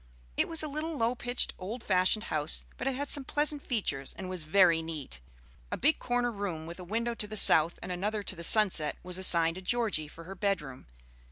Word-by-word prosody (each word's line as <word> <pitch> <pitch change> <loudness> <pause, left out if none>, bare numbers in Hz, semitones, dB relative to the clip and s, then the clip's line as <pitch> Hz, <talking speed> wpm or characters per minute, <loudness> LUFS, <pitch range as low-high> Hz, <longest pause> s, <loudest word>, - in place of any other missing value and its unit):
It - - +1
was 325 -1 +1
a - - -3
little 305 +2 -4
low 230 0 +1
pitched, 245 0 0
old 220 +6 -6
fashioned 185 +3 +2
house, 150 0 0
but - - -5
it 270 - -1
had 285 +2 -4
some 285 - +2
pleasant 295 +1 0
features, 145 - -2
and 190 - -7
was 185 -2 -3
very 165 0 +3
neat. 150 - -7 0.5
A - - -2
big 300 +5 +1
corner 245 0 -1
room 195 -7 -5
with 170 +2 -9
a - - -8
window 230 +6 -2
to 215 -2 -3
the 215 +1 -2
south 165 -3 +6
and - - -6
another 205 +4 -3
to - - -3
the 170 - -8
sunset 185 -6 +4
was 180 0 -2
assigned 170 -2 +3
to - - -8
Georgie 210 -7 0
for 165 +2 -13
her 185 +4 -9
bedroom. 180 - -3
195 Hz, 215 wpm, -29 LUFS, 165-240 Hz, 0.5 s, south